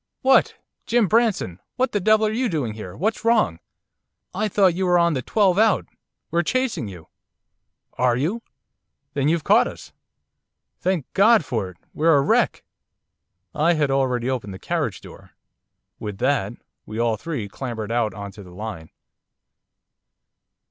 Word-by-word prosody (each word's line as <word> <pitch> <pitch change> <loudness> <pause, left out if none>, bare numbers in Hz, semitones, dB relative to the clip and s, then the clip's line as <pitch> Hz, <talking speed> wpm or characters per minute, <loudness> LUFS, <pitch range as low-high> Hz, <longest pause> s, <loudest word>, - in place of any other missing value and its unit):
'What! 265 0 +4 0.3
Jim 235 -2 +3
Branson! 210 - +1 0.2
What 260 +1 0
the 205 - 0
devil 215 +3 +4
are 215 - 0
you 240 +2 0
doing 140 -10 -2
here, 105 -4 -8
what's 215 +6 -1
wrong? 225 - +2 0.7
I 210 +4 0
thought 195 -3 +3
you 185 +2 -1
were 175 0 +4
on 170 -1 +3
the 130 - -1
twelve 195 - +2
out, 220 -1 +3 0.5
we're 170 - +2
chasing 255 - -1
you.' 90 -5 -11 0.9
'Are 125 -1 +3
you? 175 - -1 0.7
Then 140 0 0
you've 165 0 +1
caught - - +4
us. - - -10 0.9
Thank 180 -6 0
God 210 -3 +5
for 110 -8 -2
it! 90 - -15 0.2
We're 160 +1 +3
a - - +4
wreck.' - - +1 0.9
I 160 +4 +3
had 150 -4 +1
already 130 -3 0
opened 115 -7 -3
the - - -8
carriage - - -2
door. - - -14 0.7
With 105 -2 -6
that 115 -4 0 0.3
we 110 - -6
all 115 -1 +1
three 120 -2 -5
clambered 115 -1 -5
out 115 -4 0
on 100 0 -7
to 100 +1 -12
the 90 - -13
line. 90 -4 -7
145 Hz, 155 wpm, -23 LUFS, -, 0.9 s, God